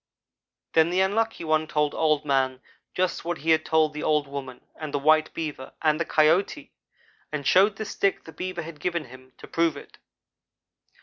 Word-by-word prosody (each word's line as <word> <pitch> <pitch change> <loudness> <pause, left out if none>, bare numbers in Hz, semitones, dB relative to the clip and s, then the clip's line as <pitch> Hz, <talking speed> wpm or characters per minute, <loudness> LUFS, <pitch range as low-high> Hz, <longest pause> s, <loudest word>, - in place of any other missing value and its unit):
"Then 160 0 +4
the 180 +2 0
Unlucky 220 +1 0
one 155 0 +1
told 150 -1 0
Old 155 -2 +1
man 130 -2 +1 0.4
just 185 0 0
what 175 0 -2
he 160 +3 0
had 160 0 +4
told 155 -1 +2
the 150 - -5
old 150 -2 +1
woman 135 -3 -8
and 155 -2 -6
the 145 - 0
white 155 +2 +3
Beaver 150 -5 -5
and 155 -1 +2
the 170 - 0
Coyote, 175 - +2 0.6
and 145 -2 -4
showed 200 +6 +5
the 220 - -5
stick 200 -1 -1
the 160 - -11
Beaver 185 0 -5
had 160 -2 -10
given 170 -2 -2
him, 130 0 -15
to - - -11
prove 165 -3 0
it. - - -13
155 Hz, 185 wpm, -25 LUFS, 145-170 Hz, 0.6 s, showed